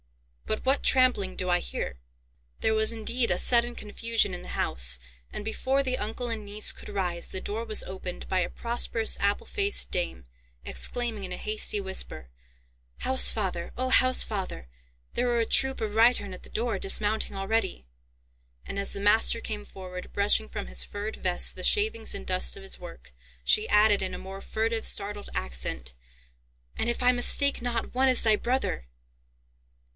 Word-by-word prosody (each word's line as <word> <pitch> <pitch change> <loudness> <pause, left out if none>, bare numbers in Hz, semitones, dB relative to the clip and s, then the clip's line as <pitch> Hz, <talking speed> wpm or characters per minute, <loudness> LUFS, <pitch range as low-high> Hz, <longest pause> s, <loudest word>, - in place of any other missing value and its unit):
But 215 - -3
what 270 +2 +2
trampling 255 -8 +3
do 185 - -2
I 175 0 +3
hear?" 60 - -5 0.6
There 220 - +1
was 220 0 +2
indeed 235 +2 0
a - - +1
sudden 240 0 +4
confusion 225 -1 0
in 180 - -5
the - - -11
house, 60 0 +4 0.3
and, 205 - -7
before 260 +5 0
the 255 -1 -2
uncle 225 +4 -4
and 225 -2 -3
niece 205 +1 +4
could - - -11
rise, 180 -4 -2
the 190 - -5
door 215 +4 -4
was 220 -2 +3
opened 185 -1 -7
by 185 - 0
a 180 - -1
prosperous 230 -1 -1
apple 200 0 0
faced 405 0 +1
dame, 175 - -2 0.4
exclaiming 235 -4 0
in 185 - -5
a 180 - -3
hasty 215 -1 0
whisper, 135 - -4 0.7
"Housefather, 200 -9 +2
O 255 +1 -2
Housefather, 215 - +2 0.5
there 245 - 0
are 240 -1 +1
a 230 - +1
troop 265 +3 +3
of 215 -2 -3
reitern 225 -3 +3
at 185 - -11
the - - -13
door, 225 -3 -2
dismounting 205 +2 +1
already;" 195 - -2 0.8
and, - - -6
as 200 - -2
the - - -3
master 215 +3 +3
came 210 -2 -5
forward, 180 -2 -9
brushing 200 - +1
from 65 - -5
his - - -1
furred 205 +2 -6
vest - - +1
the - - -8
shavings 415 - +2
and 65 - -6
dust - - 0
of - - -11
his - - -6
work, 65 +1 -12 0.3
she 215 +1 +4
added 210 0 +4
in 185 -1 -3
a - - -7
more 195 +1 -9
furtive, 225 +2 -2
startled 205 0 +1
accent, 60 0 -4 0.8
"and, - - -1
if 235 - -2
I 250 - +5
mistake 265 +3 +3
not, 235 -1 -3
one 260 +1 +3
is 255 - +5
thy 220 -1 +4
brother!" 235 - -2
210 Hz, 175 wpm, -27 LUFS, 185-235 Hz, 0.8 s, I